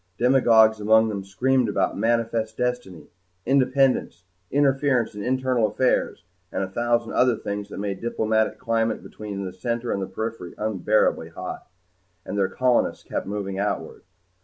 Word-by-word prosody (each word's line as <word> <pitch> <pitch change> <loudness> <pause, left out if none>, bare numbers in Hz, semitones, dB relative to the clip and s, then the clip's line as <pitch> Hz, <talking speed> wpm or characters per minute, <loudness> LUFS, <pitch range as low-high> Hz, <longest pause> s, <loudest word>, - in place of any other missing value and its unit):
Demagogues 115 -4 +5
among 110 +1 +4
them 100 -2 -4
screamed 125 +5 +1
about 100 -2 0
manifest 115 0 0
destiny, 125 -8 -3 0.3
independence, 130 -7 +2 0.3
interference 135 -4 +2
in 105 - -7
internal 130 -2 +1
affairs, 125 +4 0 0.3
and - - -2
a - - -2
thousand 120 +2 0
other 125 -2 +3
things 100 0 -5
that - - -8
made 100 -1 -4
the 120 - -1
diplomatic 110 -1 0
climate 115 0 -1
between 100 -3 -6
Center 115 +5 -3
and 95 -1 -3
Periphery 110 -4 -5
unbearably 105 0 +1
hot. - - -7 0.6
And 100 - -5
their 95 -2 +1
colonists 125 +4 +1
kept - - -4
moving 100 -1 -4
outward. 105 +1 -3
110 Hz, 140 wpm, -24 LUFS, 100-125 Hz, 0.6 s, Demagogues